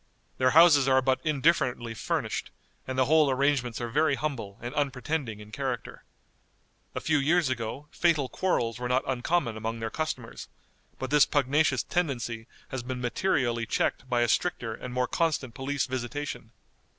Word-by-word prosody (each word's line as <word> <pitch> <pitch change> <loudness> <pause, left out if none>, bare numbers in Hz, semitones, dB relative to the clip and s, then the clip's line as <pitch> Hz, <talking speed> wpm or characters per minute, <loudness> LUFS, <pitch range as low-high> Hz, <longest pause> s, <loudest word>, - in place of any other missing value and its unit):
Their 130 0 +4
houses 150 -3 +7
are 130 0 +5
but 130 0 +1
indifferently 140 -6 +1
furnished, 110 - -2 0.4
and 130 0 -4
the 130 - +4
whole 155 +1 +4
arrangements 130 -3 +1
are 120 - -3
very 150 +4 +2
humble 130 -10 -4
and 120 +3 -6
unpretending 140 -4 -2
in 105 0 -12
character. 130 -3 -4 0.9
A - - -1
few 160 -2 +1
years 160 +1 +2
ago 120 +4 -4
fatal 160 -6 +2
quarrels 120 -10 -1
were 125 0 -3
not 125 +1 +2
uncommon 130 -1 0
among 115 +1 -4
their 115 0 -3
customers, 135 -7 -4 0.5
but 130 - -5
this 150 -1 +6
pugnacious 145 +2 +2
tendency 120 -9 -2 0.2
has 130 - -4
been 125 +1 -5
materially 120 -3 0
checked 130 - -1
by 120 -1 +2
a 120 - +3
stricter 115 -3 0
and 125 +3 -7
more 125 0 0
constant 150 -7 0
police 135 +2 -2
visitation. 130 +3 -4
130 Hz, 160 wpm, -28 LUFS, 120-150 Hz, 0.9 s, houses